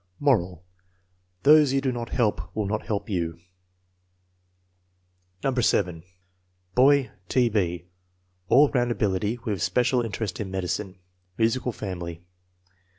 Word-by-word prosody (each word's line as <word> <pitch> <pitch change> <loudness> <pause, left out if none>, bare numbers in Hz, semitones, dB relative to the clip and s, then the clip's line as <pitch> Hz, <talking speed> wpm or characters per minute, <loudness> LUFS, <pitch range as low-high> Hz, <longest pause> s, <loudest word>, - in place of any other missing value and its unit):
Moral: 90 - +1 0.8
Those 150 -1 +6
you 135 - +3
do 135 -1 0
not 120 -1 -5
help 105 -7 -1
will 110 - -1
not 105 +2 -3
help 105 -2 -2
you. 85 -5 -2 2.1
No. 135 - +1
7. 95 -8 +1 0.7
Boy: 135 +2 +4 0.2
T. 125 -2 +3
B. 90 -5 -1 0.6
All 140 +3 +6
round 120 -3 +1
ability, 105 0 0
with 100 -6 -2
special 125 +7 +2
interest 110 -4 -4
in 105 -3 -4
medicine. 95 +1 -3 0.4
Musical 120 +3 +1
family. 85 -5 -6
110 Hz, 115 wpm, -25 LUFS, 95-125 Hz, 2.1 s, Those